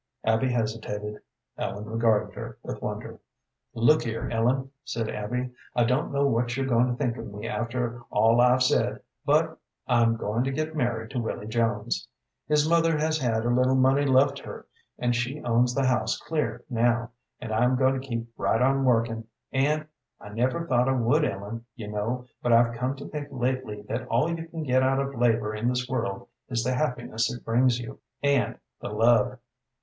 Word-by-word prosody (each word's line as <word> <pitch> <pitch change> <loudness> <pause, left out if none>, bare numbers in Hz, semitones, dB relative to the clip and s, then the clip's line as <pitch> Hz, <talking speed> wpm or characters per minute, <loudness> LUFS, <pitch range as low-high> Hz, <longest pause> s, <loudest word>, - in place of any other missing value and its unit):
Abby 110 +4 +2
hesitated. 110 -2 -3 0.4
Ellen 105 +1 -3
regarded 110 -1 +1
her - - -7
with - - -6
wonder. - - -5 0.6
"Look 120 +7 +4
here, 115 -1 -3
Ellen," 130 +4 +1
said 115 -3 -3
Abby; 125 +4 -3 0.2
"I 120 - +4
don't 125 +6 +1
know 140 0 +2
what 120 -1 +1
you're 135 - 0
going 120 -1 +3
to 125 - -1
think 125 -2 -1
of - - -7
me 105 +2 -6
after 120 0 -2
all 115 +3 +4
I've 125 +1 +5
said, 125 - +1 0.2
but - - +2 0.3
I'm 115 -2 +3
going 115 +2 -1
to 135 - 0
get 155 +3 -2
married 120 -4 -1
to 130 - -2
Willy 110 -2 -3
Jones. 110 -1 -1 0.4
His 150 0 +3
mother 165 -1 +3
has 155 +1 +1
had 115 -4 0
a 120 - +2
little 125 +2 +3
money 135 +2 +4
left 135 0 +3
her, - - -9 0.3
and 120 -1 +1
she 125 +5 -2
owns 120 +1 +2
the 135 - +2
house 120 -4 +1
clear 155 -2 -2
now, 120 -1 +1 0.3
and 115 -3 -5
I'm 125 +3 +3
going 130 0 +2
to 135 - -11
keep 115 -2 -3
right 110 - +1
on 135 +2 +3
working; 115 -2 +1 0.3
and 150 +3 +1 0.3
I 105 - -10
never 125 +10 0
thought 125 -3 +2
I - - +3
would, 120 -2 +2
Ellen, 100 +4 -3
you 110 -5 -7
know; 115 +4 -2 0.2
but 120 - +1
I've 115 0 +5
come 125 +3 -1
to 140 - -8
think 150 -2 -5
lately 130 -5 -2
that 115 +3 -4
all 125 +5 +2
you 165 0 -7
can 165 -1 -5
get 130 -2 +3
out 135 +1 +2
of 140 0 -2
labor 115 -3 +1
in 110 +2 -2
this 125 0 -1
world 115 -6 -3 0.2
is 115 -2 0
the 130 +2 0
happiness 120 -4 -1
it 120 - -8
brings 120 +1 +3
you, 120 - -8 0.2
and 140 -6 +2 0.2
the - - -4
love. 115 +3 +3
120 Hz, 190 wpm, -27 LUFS, 115-130 Hz, 0.6 s, I've